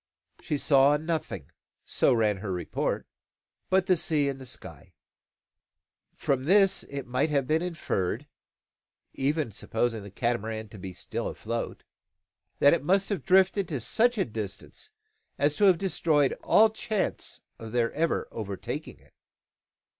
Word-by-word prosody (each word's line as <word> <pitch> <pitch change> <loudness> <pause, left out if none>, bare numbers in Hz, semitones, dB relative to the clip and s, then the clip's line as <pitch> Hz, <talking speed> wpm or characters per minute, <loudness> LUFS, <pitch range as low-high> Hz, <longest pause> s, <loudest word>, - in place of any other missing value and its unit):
She 150 - -2
saw 140 0 +4
nothing, 155 - -4 0.3
so - - +2
ran 110 -4 +2
her 95 0 -5
report, 90 -3 -2 0.6
but 190 -1 +3
the 185 - +4
sea 155 -4 +1
and 135 -1 -6
sky. - - -8 1.2
From 130 -1 -1
this 195 +3 +4
it 140 -1 -5
might 130 +5 0
have 140 -3 +1
been 155 +4 +1
inferred 145 - -2 0.9
(even 140 -2 0
supposing 115 +2 -2
the 100 - -9
Catamaran 110 0 -2
to 105 - -11
be 95 0 -6
still - - -4
afloat) 115 +1 -4 0.7
that 145 - +6
it 170 - 0
must 195 +5 +2
have 195 -10 -2
drifted 190 +2 +4
to 145 -5 -3
such 235 - +2
a 195 - +2
distance 110 - -7 0.5
as 145 +1 +2
to 205 - +4
have 185 -3 +6
destroyed 160 -6 +2
all 220 0 +5
chance 215 -2 -2 0.2
of 115 -1 -8
their 120 -1 +1
ever 165 +2 0
overtaking 100 -4 -5
it. - - -25
140 Hz, 140 wpm, -28 LUFS, 115-175 Hz, 1.2 s, that